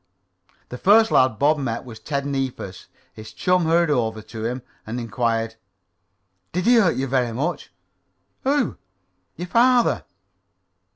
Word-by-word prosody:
The 125 - -7
first 220 +3 +5
lad 130 -4 +3
Bob 150 +5 +3
met 120 -3 -3
was 115 -3 -10
Ted 140 +4 -3
Neefus. 135 -9 -4 0.3
His 110 0 -11
chum 180 +6 +1
hurried 165 0 +3
up 110 -5 -1
to 110 -2 -6
him 125 +2 -3 0.2
and 115 +3 -5
Inquired: 115 0 -2 1.0
"Did 180 +1 -1
he 245 0 +6
hurt 190 -7 +4
you 135 - -1
very 125 -3 0
much?" 150 +9 -3 0.7
"Who?" 275 -1 +1 0.6
"Your 175 +3 -5
father." 245 +4 +3
135 Hz, 135 wpm, -22 LUFS, 115-175 Hz, 1.0 s, he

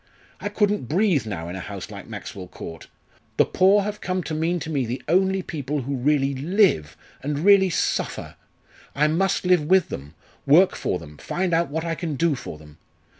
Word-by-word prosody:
I - - -3
couldn't 205 - 0
breathe 175 - +2
now 85 -6 -4
in 90 - -6
a - - -5
house - - -7
like - - -9
Maxwell 95 -2 -7
Court. 80 -2 -9 0.5
The - - +5
poor 195 +2 +4
have 210 +1 -5
come 185 0 -2
to 160 - -5
mean 165 +3 0
to 155 - -5
me 140 -4 0
the 120 +2 -4
only 190 +3 +2
people 145 -5 -3
who 140 +3 -3
really 140 +1 +1
live, 140 - +2 0.2
and 145 +3 -2
really 200 -2 +6
suffer. 160 - -2 0.6
I 145 +2 +3
must 185 +5 +1
live 180 -3 +4
with 185 +3 +3
them, 70 +4 -7 0.3
work 170 +7 +6
for - - -1
them, 75 -3 -12
find 180 -1 -2
out 165 -3 +2
what 160 +3 -3
I 165 - -1
can 165 -3 -3
do 165 +3 +2
for 125 - -7
them. 75 0 -16
155 Hz, 195 wpm, -24 LUFS, 130-185 Hz, 0.6 s, really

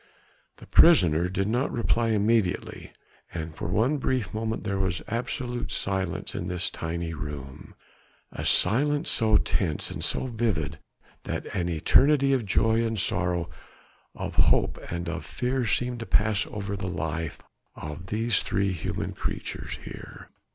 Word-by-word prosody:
The - - -13
prisoner 90 - +6
did 95 +1 -1
not 125 +5 0
reply 115 0 +1
immediately, 110 -2 0 0.4
and 80 -1 -5
for 80 - -5
one 115 - +2
brief 125 -6 -1
moment 110 +1 -2
there 100 -2 -1
was 95 -2 -1
absolute 120 +2 -3
silence 95 -2 -2
in 85 - -3
this 90 0 0
tiny 80 0 -4
room, 70 -3 -7 0.6
a - - -5
silence 145 - +3
so 110 -2 +4
tense 80 -6 0
and - - -5
so - - +1
vivid 110 - -1 0.5
that - - -3
an 85 -1 0
eternity 135 - +4
of 120 -6 0
joy 110 +3 +3
and 115 -2 -1
sorrow, 90 -1 0 0.7
of - - -4
hope - - +3
and 85 0 -3
of 90 +1 -3
fear 125 -1 -1
seemed 125 +3 0
to 115 - -6
pass 105 +2 +2
over 100 -1 -4
the 95 -1 -4
life 80 -2 -3 0.4
of 75 +4 -7
these 110 +1 +1
three 100 0 0
human 90 - -3
creatures - - -4
here. - - -10
100 Hz, 145 wpm, -27 LUFS, 85-115 Hz, 0.7 s, prisoner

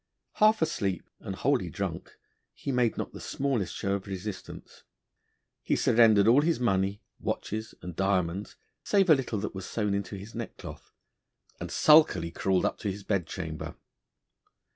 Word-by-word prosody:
Half 215 -3 +5
asleep, 100 - -2
and 95 - -6
wholly 125 -6 +1
drunk, - - -5 0.4
he 140 - -4
made 125 -3 +1
not - - -3
he - - -10
smallest 120 -11 -2
show 100 - -1
of 100 -1 -3
resistance; 95 +1 -7 0.8
he - - 0
surrendered 110 -3 +5
all 125 +5 +6
his 160 -1 +1
money, 100 -4 0 0.2
watches, 110 +1 -4
and 90 -2 -7
diamonds, 95 0 0 0.3
save 195 -4 +3
a - - +9
little 125 -5 -2
that 105 - -4
was 95 -1 -6
sewn 105 -3 -1
into 100 0 -3
his 100 +3 -9
neckcloth, 115 -1 -8 0.7
and - - -5
sulkily 150 - +5
crawled 95 +1 +1
up - - -1
to 105 - -2
his 100 +1 -6
bed 100 -5 -1
chamber. 80 -4 -6
100 Hz, 155 wpm, -28 LUFS, 95-125 Hz, 0.8 s, a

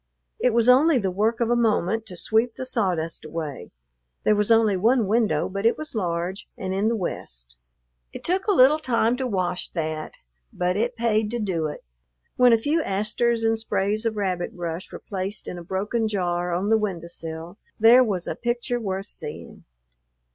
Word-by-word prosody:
It 250 - +3
was 230 +1 +2
only 275 +4 +6
the 195 -5 0
work 220 +5 0
of 235 0 +1
a - - +4
moment 225 -2 +1
to 180 - -8
sweep 225 +5 +1
the 260 - -5
sawdust 185 -10 -1
away. 155 -3 -6 0.5
There 215 - +4
was 210 0 +1
only 225 -3 +4
one 225 +5 +3
window, 210 -7 +1
but 195 +1 -4
it 230 - +3
was 310 - -6
large 180 -2 -3
and 190 -1 -3
in 200 +3 +1
the 230 - +1
west. - - -6 0.6
It - - -9
took 375 +3 0
a - - +4
little 300 -3 +6
time 235 -4 +1
to 260 -1 -2
wash 185 -4 -1
that, 155 -2 -4 0.4
but 180 +1 -1
it 230 +4 -1
paid 220 -2 +1
to 240 +2 -3
do 175 -7 -1
it. 150 - -8 0.5
When 250 -1 +6
a 230 - +6
few 295 +8 0
asters 220 +2 0
and 225 0 +2
sprays 210 0 -1
of 220 -1 -3
rabbit 185 -3 -2
brush 175 +2 -5
were - - -6
placed 195 0 -5
in 175 - -5
a - - -9
broken 210 +6 -1
jar 175 -4 -1
on 185 +4 -1
the 220 - +5
window 185 -6 -3
sill, 165 +2 -8 0.2
there 235 +4 +7
was 195 -7 -2
a - - -1
picture 240 +1 -2
worth 195 -3 -3
seeing. - - -9
210 Hz, 190 wpm, -24 LUFS, 180-235 Hz, 0.6 s, there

